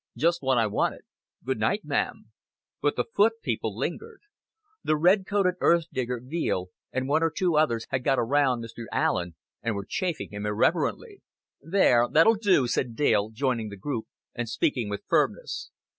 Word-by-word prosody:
Just 170 Hz, +6 st, +2 dB
what 130 Hz, -2 st, +2 dB
I 115 Hz, -, +3 dB
wanted.... 105 Hz, -, -1 dB, 0.4 s
Good -, -, -1 dB
night, -, -, 0 dB
ma'am;" -, -, -2 dB, 0.5 s
but 145 Hz, 0 st, +1 dB
the -, -, +1 dB
foot 225 Hz, 0 st, +2 dB
people 110 Hz, -3 st, -2 dB
lingered. 415 Hz, -, -5 dB, 0.6 s
The 155 Hz, -, +2 dB
red 185 Hz, +5 st, +3 dB
coated 195 Hz, -3 st, +2 dB
earth 170 Hz, -1 st, +3 dB
digger, 125 Hz, -1 st, -2 dB
Veale, 125 Hz, -, -2 dB, 0.2 s
and 130 Hz, 0 st, -2 dB
one 150 Hz, +3 st, +2 dB
or 165 Hz, -, +3 dB
two 170 Hz, +1 st, 0 dB
others, 135 Hz, -7 st, +2 dB
had 130 Hz, -1 st, -1 dB
got 135 Hz, -, +2 dB
around 125 Hz, 0 st, +2 dB
Mr. 115 Hz, +1 st, -8 dB
Allen 90 Hz, -2 st, 0 dB, 0.3 s
and 115 Hz, -2 st, -1 dB
were 100 Hz, -1 st, -4 dB
chaffing 180 Hz, -5 st, -3 dB
him 105 Hz, 0 st, -6 dB
irreverently. 175 Hz, -, 0 dB, 0.4 s
"There, 145 Hz, -10 st, +3 dB
that'll 165 Hz, +9 st, +6 dB
do," 195 Hz, -, +3 dB
said 120 Hz, -1 st, -1 dB
Dale, 110 Hz, -6 st, +2 dB
joining 115 Hz, -1 st, -1 dB
the 100 Hz, -, -9 dB
group 115 Hz, +2 st, -4 dB, 0.3 s
and 120 Hz, -1 st, -4 dB
speaking 115 Hz, -1 st, 0 dB
with 100 Hz, -, -5 dB
firmness. -, -, 0 dB
130 Hz, 170 wpm, -26 LUFS, 115-170 Hz, 0.6 s, that'll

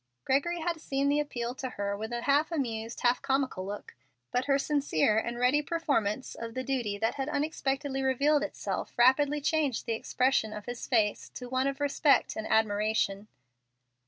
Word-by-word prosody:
Gregory 335 Hz, +6 st, +1 dB
had 335 Hz, -1 st, -2 dB
seen 275 Hz, -1 st, 0 dB
the 290 Hz, +1 st, +3 dB
appeal 245 Hz, -5 st, -3 dB
to 260 Hz, -1 st, -5 dB
her 200 Hz, -4 st, -3 dB
with 220 Hz, +3 st, -5 dB
an 240 Hz, 0 st, -3 dB, 0.3 s
amused, 230 Hz, -8 st, -3 dB
half 245 Hz, 0 st, +3 dB
comical 265 Hz, -8 st, 0 dB
look, 205 Hz, +1 st, -7 dB, 0.4 s
but 250 Hz, +1 st, 0 dB
her 275 Hz, -1 st, +3 dB
sincere 280 Hz, -, +1 dB
and 235 Hz, +1 st, -4 dB
ready 250 Hz, +4 st, +3 dB
performance 275 Hz, -8 st, -1 dB
of 230 Hz, 0 st, -7 dB
the 255 Hz, -, -2 dB
duty 245 Hz, -7 st, -1 dB
that 225 Hz, +2 st, 0 dB
had 270 Hz, +1 st, -3 dB
unexpectedly 280 Hz, -2 st, -1 dB
revealed 280 Hz, +3 st, +3 dB
itself 300 Hz, -, -4 dB
rapidly 280 Hz, +4 st, +4 dB
changed 295 Hz, -4 st, 0 dB
the 230 Hz, -, -1 dB
expression 240 Hz, -1 st, +1 dB
of 210 Hz, -1 st, -7 dB
his 245 Hz, 0 st, -6 dB
face 220 Hz, -5 st, +1 dB
to 250 Hz, -, -8 dB
one 260 Hz, +1 st, +1 dB
of 275 Hz, 0 st, -3 dB
respect 285 Hz, 0 st, +2 dB
and 220 Hz, -, -4 dB
admiration. 210 Hz, -1 st, +1 dB
260 Hz, 170 wpm, -29 LUFS, 225-285 Hz, 0.4 s, rapidly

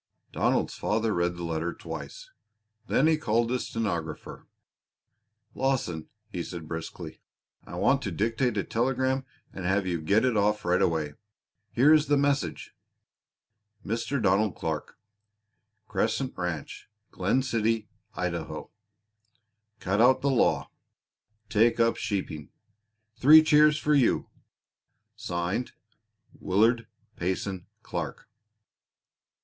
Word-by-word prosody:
Donald's -, -, +1 dB
father 110 Hz, 0 st, 0 dB
read 85 Hz, 0 st, 0 dB
the 85 Hz, -, -6 dB
letter 85 Hz, +1 st, -2 dB
twice. -, -, -8 dB, 0.6 s
Then 140 Hz, -, +3 dB
he 160 Hz, -1 st, +3 dB
called 115 Hz, -3 st, +1 dB
his 125 Hz, -, -1 dB
stenographer. 85 Hz, -9 st, -4 dB, 1.1 s
"Lawson," 125 Hz, -12 st, -1 dB, 0.2 s
he 95 Hz, -5 st, -5 dB
said 85 Hz, -2 st, -7 dB
briskly, 80 Hz, +1 st, -7 dB, 0.4 s
"I -, -, -9 dB
want -, -, +2 dB
to -, -, -3 dB
dictate 115 Hz, +2 st, 0 dB
a 100 Hz, -, +1 dB
telegram 130 Hz, +2 st, 0 dB, 0.3 s
and 95 Hz, -, -7 dB
have 95 Hz, +2 st, +1 dB
you 85 Hz, -3 st, -2 dB
get 100 Hz, +10 st, +3 dB
it 125 Hz, -3 st, +1 dB
off 105 Hz, 0 st, +1 dB
right 90 Hz, +1 st, +2 dB
away. 80 Hz, -3 st, 0 dB, 0.6 s
Here 140 Hz, +6 st, +5 dB
is 155 Hz, -1 st, +4 dB
the 145 Hz, 0 st, +3 dB
message: 140 Hz, 0 st, -1 dB, 1.1 s
"Mr. 115 Hz, +6 st, -1 dB
Donald 100 Hz, -1 st, +2 dB
Clark, 80 Hz, -2 st, -4 dB, 0.9 s
Crescent 125 Hz, +4 st, -1 dB
Ranch, 90 Hz, -5 st, -5 dB, 0.2 s
Glen 100 Hz, +8 st, +1 dB
City, 115 Hz, -3 st, 0 dB, 0.3 s
Idaho. 85 Hz, -3 st, -4 dB, 1.1 s
"Cut 100 Hz, +4 st, 0 dB
out 130 Hz, +2 st, +5 dB
the 140 Hz, -, +2 dB
law. 130 Hz, -, +2 dB, 0.8 s
Take 115 Hz, +3 st, +3 dB
up 115 Hz, 0 st, +3 dB
sheeping. 80 Hz, -8 st, -4 dB, 0.7 s
Three 155 Hz, +4 st, +9 dB
cheers 150 Hz, 0 st, +5 dB
for 150 Hz, 0 st, +1 dB
you! 135 Hz, -5 st, +2 dB, 0.9 s
"(Signed) 85 Hz, +8 st, -3 dB, 0.7 s
WILLARD 115 Hz, +5 st, +2 dB, 0.3 s
PAYSON 95 Hz, 0 st, -3 dB, 0.2 s
CLARK. -, -, -5 dB
110 Hz, 115 wpm, -27 LUFS, 90-130 Hz, 1.1 s, Three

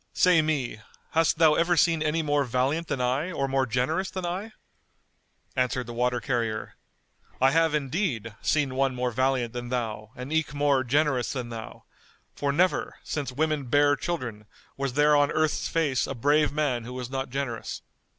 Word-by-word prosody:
Say 180 Hz, -3 st, +5 dB
me, 145 Hz, -8 st, -1 dB, 0.3 s
hast 165 Hz, -1 st, +2 dB
thou 160 Hz, -2 st, +6 dB
ever 170 Hz, +2 st, +2 dB
seen 165 Hz, 0 st, +3 dB
any 155 Hz, +1 st, +1 dB
more 145 Hz, -1 st, +2 dB
valiant 135 Hz, +6 st, 0 dB
than 135 Hz, -, -2 dB
I 130 Hz, +8 st, 0 dB
or 140 Hz, -5 st, -1 dB
more 135 Hz, -1 st, +1 dB
generous 130 Hz, +11 st, 0 dB
than 185 Hz, -1 st, -4 dB
I?" 190 Hz, +6 st, -4 dB, 1.0 s
Answered 125 Hz, 0 st, 0 dB
the 120 Hz, -, -7 dB
water 125 Hz, +1 st, 0 dB
carrier; 115 Hz, -4 st, -2 dB, 0.7 s
"I 130 Hz, +1 st, +5 dB
have 165 Hz, 0 st, +3 dB
indeed, 135 Hz, -, -2 dB
seen 145 Hz, -3 st, +1 dB
one 135 Hz, 0 st, +1 dB
more 125 Hz, 0 st, -1 dB
valiant 130 Hz, -1 st, 0 dB
than 120 Hz, 0 st, -5 dB
thou 110 Hz, -4 st, -3 dB
and 130 Hz, +4 st, -6 dB
eke 160 Hz, -2 st, 0 dB
more 145 Hz, -2 st, +2 dB
generous 135 Hz, -1 st, +1 dB
than 125 Hz, -3 st, -4 dB
thou; 115 Hz, -1 st, -8 dB, 0.5 s
for, 140 Hz, -1 st, -1 dB
never, 180 Hz, +6 st, +1 dB
since 145 Hz, -4 st, -3 dB
women 150 Hz, +1 st, 0 dB
bare 145 Hz, +3 st, +4 dB
children, 120 Hz, -, -4 dB, 0.3 s
was 135 Hz, -2 st, -2 dB
there 150 Hz, +2 st, +4 dB
on 145 Hz, 0 st, +4 dB
earth's 155 Hz, -1 st, 0 dB
face 150 Hz, -6 st, 0 dB
a 135 Hz, -, -4 dB
brave 145 Hz, +5 st, +3 dB
man 140 Hz, -5 st, 0 dB
who 125 Hz, +2 st, -8 dB
was 125 Hz, -1 st, -5 dB
not 135 Hz, -1 st, -3 dB
generous." 125 Hz, -4 st, -4 dB
135 Hz, 175 wpm, -27 LUFS, 125-155 Hz, 1.0 s, thou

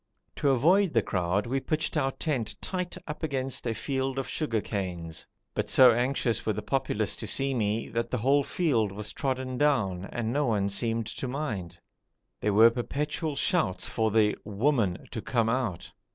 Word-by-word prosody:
To 140 Hz, -, +2 dB
avoid 170 Hz, +9 st, +4 dB
the 115 Hz, -, +4 dB
crowd 90 Hz, +2 st, 0 dB
we 130 Hz, +3 st, 0 dB
pitched 155 Hz, +4 st, -1 dB
our 135 Hz, -3 st, +1 dB
tent 130 Hz, -8 st, -2 dB
tight 180 Hz, -2 st, -3 dB
up 150 Hz, -, -6 dB
against 135 Hz, -4 st, -2 dB
a 115 Hz, -, -1 dB
field 135 Hz, 0 st, -2 dB
of 135 Hz, -, -2 dB
sugar 135 Hz, -8 st, -1 dB
canes, 90 Hz, -6 st, -4 dB, 0.3 s
but -, -, -2 dB
so 130 Hz, -2 st, +8 dB
anxious 125 Hz, 0 st, 0 dB
were 110 Hz, -, 0 dB
the 105 Hz, -, -5 dB
populace 130 Hz, -4 st, 0 dB
to -, -, -5 dB
see 135 Hz, 0 st, +1 dB
me, 110 Hz, -2 st, 0 dB
that 115 Hz, +1 st, -2 dB
the 125 Hz, -, -1 dB
whole 135 Hz, +5 st, +3 dB
field 130 Hz, -, +1 dB
was 105 Hz, +1 st, -5 dB
trodden 130 Hz, -2 st, -2 dB
down 110 Hz, -12 st, +1 dB
and 115 Hz, +2 st, -3 dB
no 145 Hz, -1 st, +1 dB
one 100 Hz, -3 st, +1 dB
seemed 115 Hz, +2 st, 0 dB
to 120 Hz, +4 st, -5 dB
mind. 110 Hz, -, -4 dB, 0.6 s
There 105 Hz, -, +1 dB
were 115 Hz, +2 st, +8 dB
perpetual 145 Hz, +5 st, -2 dB
shouts 140 Hz, -, +1 dB
for 110 Hz, -1 st, 0 dB
the 105 Hz, -1 st, +3 dB
'woman' 105 Hz, -2 st, 0 dB
to 110 Hz, -, -4 dB
come 115 Hz, -1 st, +1 dB
out. 115 Hz, -8 st, -2 dB
120 Hz, 180 wpm, -28 LUFS, 105-140 Hz, 0.6 s, so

